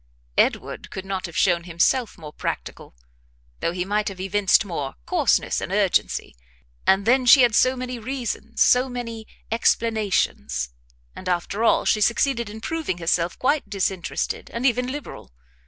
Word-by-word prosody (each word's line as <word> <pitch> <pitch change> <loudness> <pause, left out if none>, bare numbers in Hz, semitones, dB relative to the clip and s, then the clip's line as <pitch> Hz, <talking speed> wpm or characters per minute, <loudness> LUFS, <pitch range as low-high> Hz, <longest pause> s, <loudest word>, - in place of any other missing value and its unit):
Edward - - 0
could 190 - -7
not 190 -1 -3
have 170 - -8
shown 175 -3 +2
himself 185 +8 +1
more 155 -2 -10
practical, - - -5 0.6
though 165 - 0
he 180 +1 -3
might 210 +2 0
have 195 -2 -5
evinced 195 +2 +2
more 150 -8 -4
coarseness - - +1
and - - -5
urgency; - - 0 0.5
and 195 +1 +4
then 255 +3 +4
she 260 +1 +9
had 240 -2 +4
so 255 +3 +4
many 250 -1 -5
reasons, 235 -2 -2
so 250 +1 +4
many 230 -3 -6 0.2
explanations; 205 - 0 0.5
and, 185 - -6
after 180 +5 -1
all, - - +3
she 215 - +2
succeeded 235 +1 +1
in 220 +1 -9
proving 320 - -3
herself 170 0 0
quite 285 +3 0
disinterested 190 -3 -2
and 235 +2 -3
even 250 -1 +2
liberal. 290 - -8
215 Hz, 155 wpm, -23 LUFS, 180-245 Hz, 0.6 s, she